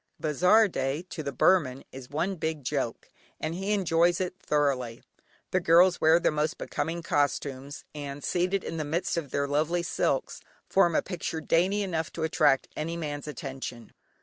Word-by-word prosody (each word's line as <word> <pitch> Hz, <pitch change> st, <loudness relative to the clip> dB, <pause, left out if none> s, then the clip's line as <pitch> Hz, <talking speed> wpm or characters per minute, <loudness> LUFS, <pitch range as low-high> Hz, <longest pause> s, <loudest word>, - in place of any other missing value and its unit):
"Bazaar 180 Hz, +9 st, +4 dB
day," 135 Hz, -2 st, -2 dB
to 160 Hz, -, -4 dB
the 140 Hz, -2 st, -3 dB
Burman 135 Hz, -2 st, +2 dB
is 130 Hz, -1 st, -10 dB
one 165 Hz, +7 st, -1 dB
big 160 Hz, -3 st, -3 dB
joke, 130 Hz, -3 st, -2 dB, 0.3 s
and 155 Hz, +1 st, -3 dB
he 195 Hz, +4 st, -2 dB
enjoys 175 Hz, -3 st, +3 dB
it 185 Hz, -1 st, -2 dB
thoroughly. 135 Hz, -8 st, 0 dB, 0.5 s
The 185 Hz, -, +3 dB
girls 175 Hz, +1 st, +5 dB
wear 160 Hz, +2 st, +6 dB
their -, -, +2 dB
most 150 Hz, +1 st, -1 dB
becoming 165 Hz, +3 st, -3 dB
costumes, 145 Hz, -1 st, -1 dB
and 145 Hz, -1 st, -6 dB
seated 185 Hz, +2 st, 0 dB
in 165 Hz, -, -5 dB
the 155 Hz, -, -1 dB
midst 165 Hz, +6 st, -1 dB
of 165 Hz, -5 st, -3 dB
their 140 Hz, +1 st, -1 dB
lovely 155 Hz, +5 st, 0 dB
silks, 340 Hz, -, -1 dB, 0.3 s
form 175 Hz, -4 st, +3 dB
a -, -, +2 dB
picture 170 Hz, -3 st, -4 dB
dainty 185 Hz, +6 st, +2 dB
enough 165 Hz, -4 st, -2 dB
to 165 Hz, -, -4 dB
attract 160 Hz, -4 st, +3 dB
any 165 Hz, +2 st, -3 dB
man's 150 Hz, -3 st, -4 dB
attention. 135 Hz, -5 st, -7 dB
160 Hz, 170 wpm, -28 LUFS, 145-175 Hz, 0.5 s, wear